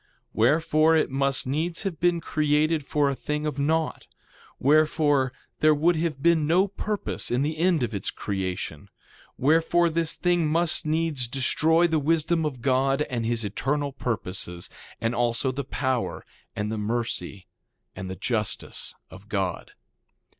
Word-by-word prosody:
2:12 - - -38 0.3
Wherefore, 155 +6 +3
it 160 - +2
must 135 0 +2
needs 160 +8 -1
have 185 -7 -3
been 175 0 +2
created 155 +1 +1
for 145 +1 +1
a 140 - +1
thing 150 +3 -3
of 150 -2 -3
naught; 160 +3 0 0.5
wherefore 145 -2 +3 0.3
there 155 0 +5
would 170 +4 +3
have 155 -4 -2
been 165 -3 +3
no 180 +5 +4
purpose 205 +1 -3
in 125 +3 +1
the 155 +1 -2
end 170 -5 +2
of 115 -2 -2
its 100 -2 -3
creation. 95 -6 -4 0.5
Wherefore, 165 +4 +3
this 165 0 0
thing 175 -3 +1
must 165 0 +2
needs 155 -5 0
destroy 155 +6 +2
the 160 -2 +2
wisdom 160 +2 +1
of 130 -5 -7
God 135 +1 +2
and 115 -2 -1
his 115 -1 0
eternal 140 +8 -1
purposes, 95 -8 -4 0.3
and 115 +1 -1
also 120 +2 0
the 140 +2 -4
power, 130 -2 -2 0.3
and 105 +1 -2
the 110 - -3
mercy, 110 -3 -3 0.5
and 95 0 -6
the 95 - -5
justice 105 +2 -2 0.2
of 95 +2 -13
God. 95 -4 -2
145 Hz, 155 wpm, -25 LUFS, 120-160 Hz, 0.5 s, there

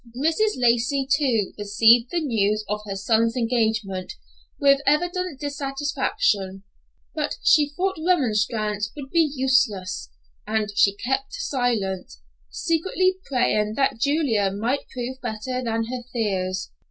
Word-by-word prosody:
Mrs. 330 +10 +1
Lacey, 250 +3 +2
too, 265 -8 +1
received 225 +4 +4
the 345 +2 -1
news 215 -6 0
of 210 +1 -2
her 195 - -4
son's 230 +4 +1
engagement 220 -5 -1 0.5
with 275 0 +4
evident 350 +1 0
dissatisfaction; 275 -9 -1 0.5
but 300 -2 -2
she 295 -1 +5
thought 375 +4 -2
remonstrance 215 - 0
would 275 -2 -8
be 330 -3 +3
useless, 225 - +1 0.4
and 215 -1 -1
she 200 0 +4
kept 265 +5 -2
silent, 245 - -2 0.4
secretly 370 - 0
praying 215 -5 +1
that 270 -3 +1
Julia 265 -7 +1
might 225 +8 -2
prove 255 +1 -6
better 245 +2 -4
than 225 -1 -1
her 245 +2 -5
fears. 190 -5 -2
245 Hz, 120 wpm, -23 LUFS, 210-285 Hz, 0.5 s, she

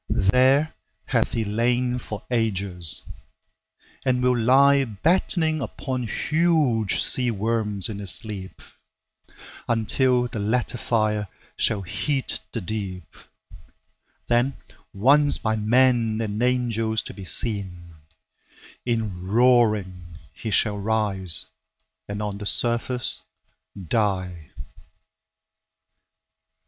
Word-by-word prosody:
There 135 +6 +3 0.3
hath - - 0
he 115 -1 -1
lain 120 +4 0
for 105 -5 -7
ages, 100 -8 -1 1.0
and 125 -1 +1
will 125 0 +3
lie 135 +4 +5
Battening 160 - 0
upon 130 -3 -4
huge 150 - +1
sea 125 -1 +2
worms 105 -2 0
in 105 -2 -6
his 100 -2 0
sleep, 95 0 -2 1.0
Until 125 +2 +1
the 115 - -6
latter 120 +3 -1
fire 105 -3 0 0.3
shall 100 -3 +1
heat 100 +10 -2
the 115 - -4
deep; 95 -3 -6 1.1
Then 120 +3 +1 0.3
once 140 +8 +4
by 110 0 -1
man 115 0 +2
and 110 -1 -3
angels 115 -3 0
to - - -9
be 100 - -10
seen, 95 -5 -2 0.9
In 110 -7 -3
roaring 105 -7 +2 0.2
he 110 - -6
shall 105 0 +2
rise 100 -4 +1 0.6
and 100 +1 -4
on 100 -1 -4
the 105 - -4
surface 120 -4 0 0.7
die. 90 - -1
110 Hz, 100 wpm, -24 LUFS, 100-125 Hz, 1.1 s, lie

